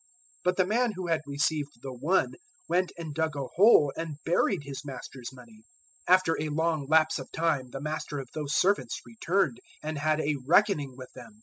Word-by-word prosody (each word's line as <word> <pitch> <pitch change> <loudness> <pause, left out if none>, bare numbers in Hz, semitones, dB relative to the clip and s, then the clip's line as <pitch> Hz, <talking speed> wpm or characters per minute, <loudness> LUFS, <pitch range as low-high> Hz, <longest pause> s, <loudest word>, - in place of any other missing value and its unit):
025:018 - - -31
But 180 0 +2
the 185 - +4
man 235 +4 +1
who 185 -1 -4
had 165 -1 +2
received 145 +1 -1
the 135 -1 -5
one 155 +10 +1 0.3
went 180 +1 +1
and 160 -3 -6
dug 160 0 -1
a 140 -1 -3
hole 180 -8 +6
and 160 -3 -5
buried 175 +1 +2
his 140 +1 -7
master's 130 -2 -8
money. 120 -4 -15 0.5
025:019 180 - +10
"After 175 -4 0
a 155 - -2
long 160 -1 0
lapse 155 +1 +4
of - - -9
time 155 -6 0
the 135 - -7
master 150 -1 -4
of 135 - -5
those 150 -1 -2
servants 200 +2 +2
returned, 190 - 0 0.2
and 155 -1 -3
had 155 +1 +1
a 150 -1 0
reckoning 160 -7 +3
with 130 -1 -10
them. 120 -4 -12
155 Hz, 200 wpm, -28 LUFS, 140-175 Hz, 0.5 s, 025:019